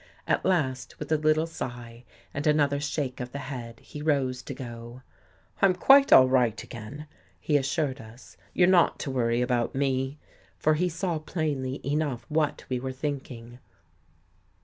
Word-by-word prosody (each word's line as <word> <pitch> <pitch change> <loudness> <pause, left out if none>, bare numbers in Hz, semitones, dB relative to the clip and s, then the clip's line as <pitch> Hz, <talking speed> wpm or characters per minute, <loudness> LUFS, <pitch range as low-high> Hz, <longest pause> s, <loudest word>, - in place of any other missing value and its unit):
At - - +1
last, 135 -9 0
with 150 - -7
a - - +5
little 155 +1 +2
sigh, 120 -6 -7 0.3
and 145 +2 -2
another 145 -2 +3
shake 145 -3 -3
of 125 0 -5
the 140 - -5
head, 125 -4 -7
he 150 - -9
rose 135 -4 0
to - - -7
go. 120 0 -9 0.3
" - - -30
I'm 190 -2 +5
quite 275 +8 +6
all 130 - +9
right 125 -4 +2
again," 120 +7 -9 0.3
he 150 - 0
assured 140 -1 0
us. 115 +3 -14
" - - -32
You're 175 - +5
not 180 -2 +4
to 135 - -3
worry 120 -1 +1
about 125 -1 0
me." 135 0 0 0.4
For 155 - +2
he 180 +4 +1
saw 170 -1 -2
plainly 145 -5 -3
enough 140 -4 -1
what 155 -1 0
we 130 -1 -2
were 130 +1 -4
thinking. 130 -4 -6
135 Hz, 170 wpm, -27 LUFS, 125-155 Hz, 0.4 s, all